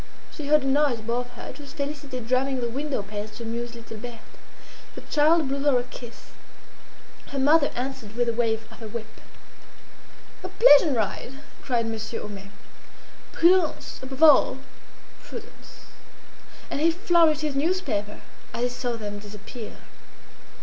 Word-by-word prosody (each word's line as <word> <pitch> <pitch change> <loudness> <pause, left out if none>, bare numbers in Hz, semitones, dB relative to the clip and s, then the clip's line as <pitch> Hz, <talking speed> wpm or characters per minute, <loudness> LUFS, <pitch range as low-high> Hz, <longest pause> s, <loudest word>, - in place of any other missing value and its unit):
She 300 -3 -6
heard 300 -1 +5
a - - -1
noise 280 -2 +3
above 240 +3 -2
her; - - -8
it - - -10
was 280 -2 -11
Félicité 280 -4 -5
drumming 260 +2 +2
on 255 - -3
the 235 - -1
windowpanes 215 -6 -4
to 235 - -7
amuse 235 +1 -4
little 230 -1 -9
Berthe. 230 0 -10 0.6
The - - -8
child 310 0 +3
blew 275 +1 -2
her 280 -2 +3
a 245 - 0
kiss; 245 -1 -12 1.0
her 280 - -6
mother 290 +2 +5
answered 250 -4 -5
with 240 0 +1
a 235 - +1
wave 225 -1 0
of - - -13
her 225 - -7
whip. 220 0 -8 1.2
"A - - -3
pleasant 290 - +6
ride!" 220 +4 -2 0.3
cried 240 -3 0
Monsieur 225 0 -4
Homais. 200 -1 -8 0.8
"Prudence! 345 -1 +2
above 265 +3 -3
all, 290 -4 +7 0.7
prudence!" - - -11 0.9
And - - -1
he 330 - +5
flourished 335 -3 +3
his 305 -2 -1
newspaper 275 - -1 0.3
as 235 - -1
he 245 - +2
saw 245 0 -3
them 205 -3 -5
disappear. 210 +2 -9
250 Hz, 150 wpm, -25 LUFS, 225-290 Hz, 1.2 s, all